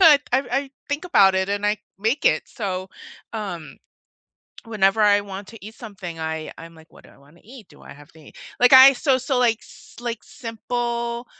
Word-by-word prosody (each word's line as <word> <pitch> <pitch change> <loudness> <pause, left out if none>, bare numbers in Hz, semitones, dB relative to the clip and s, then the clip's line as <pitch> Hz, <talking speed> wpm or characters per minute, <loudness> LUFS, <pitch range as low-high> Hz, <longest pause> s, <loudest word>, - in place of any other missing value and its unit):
I 320 -5 +8
I 270 +1 0 0.2
think 290 +5 -3
about 195 - +4
it 190 +1 0
and 205 +1 -1
I 210 0 0 0.2
make 225 +8 -1
it, - - +3
so, 190 -5 -5 0.4
um, 175 -10 -6 0.9
whenever 210 -2 +1
I 205 -1 +5
want 200 0 -9
to 225 -3 -13
eat 220 +1 -10
something, 190 -7 -9
I 160 0 -4
I'm 165 0 -11
like, 160 0 -19
"What - - -18
do - - -17
I - - -21
wanna 145 +5 -22
eat? 230 -2 -14
Do 145 - -19
I - - -12
have 145 +1 -16
to 160 - -19
eat?" 150 - -17 0.2
Like 245 +1 +5
I 265 +1 +10
So 265 0 +1
so, 260 0 -1
like, 230 -3 +2
s - - -17
like, 235 -2 -5
simple 235 +1 -4
215 Hz, 200 wpm, -22 LUFS, 190-245 Hz, 0.9 s, I